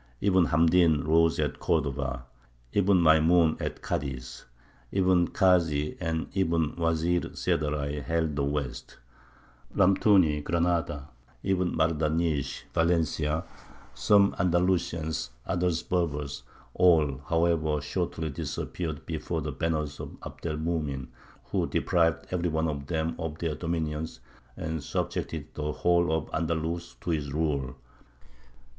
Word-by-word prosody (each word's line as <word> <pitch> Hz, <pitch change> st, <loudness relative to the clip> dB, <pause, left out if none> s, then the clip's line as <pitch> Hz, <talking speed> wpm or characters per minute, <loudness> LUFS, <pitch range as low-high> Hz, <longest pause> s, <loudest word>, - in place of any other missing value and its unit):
Ibn 95 Hz, -3 st, +3 dB
Hamdīn 80 Hz, -1 st, +4 dB
rose 80 Hz, +1 st, +3 dB
at -, -, -1 dB
Cordova, 65 Hz, -3 st, -1 dB, 0.5 s
Ibn 100 Hz, -2 st, +4 dB
Maymūn 80 Hz, +1 st, +4 dB
at -, -, -4 dB
Cadiz, 65 Hz, -3 st, -4 dB, 0.5 s
Ibn 90 Hz, -2 st, +3 dB
Kāsy 85 Hz, -6 st, +2 dB
and 80 Hz, -2 st, -1 dB
Ibn 85 Hz, -5 st, +1 dB
Wezīr 85 Hz, +1 st, 0 dB
Seddaray 75 Hz, 0 st, -1 dB
held 80 Hz, -1 st, -1 dB
the 70 Hz, -, 0 dB
west, 70 Hz, -3 st, -3 dB, 0.8 s
Lamtūny 90 Hz, -5 st, +4 dB
Granada, 85 Hz, -3 st, 0 dB, 0.3 s
Ibn 90 Hz, -3 st, 0 dB
Mardanīsh, 80 Hz, -2 st, 0 dB
Valencia; 80 Hz, -2 st, +1 dB, 0.5 s
some 100 Hz, -1 st, +4 dB
Andalusians, 85 Hz, -5 st, 0 dB, 0.2 s
others 90 Hz, -2 st, 0 dB
Berbers. 75 Hz, -5 st, -2 dB, 0.3 s
All, 80 Hz, -7 st, +3 dB
however, 80 Hz, -3 st, +2 dB
shortly 80 Hz, +1 st, -3 dB
disappeared 80 Hz, +2 st, -4 dB
before 80 Hz, 0 st, -3 dB
the 75 Hz, -, -3 dB
banners 75 Hz, 0 st, -2 dB
of -, -, -8 dB
Abd -, -, -7 dB
el 75 Hz, -2 st, -2 dB
Mumin, 75 Hz, -5 st, -2 dB, 0.4 s
who -, -, +1 dB
deprived 85 Hz, -3 st, +1 dB
every 90 Hz, -1 st, 0 dB
one 80 Hz, 0 st, 0 dB
of 70 Hz, -2 st, -4 dB
them 80 Hz, +1 st, -1 dB
of 80 Hz, -2 st, -4 dB
their 85 Hz, -2 st, -2 dB
dominions, 80 Hz, -1 st, -3 dB, 0.4 s
and 80 Hz, -2 st, -4 dB
subjected 80 Hz, -1 st, -3 dB
the 75 Hz, 0 st, -3 dB
whole 85 Hz, +1 st, +2 dB
of 80 Hz, -1 st, 0 dB
Andalus 85 Hz, +1 st, -2 dB
to 85 Hz, -, -2 dB
his 75 Hz, -3 st, -2 dB
rule." 70 Hz, -4 st, -1 dB
80 Hz, 115 wpm, -28 LUFS, 75-85 Hz, 0.8 s, Hamdīn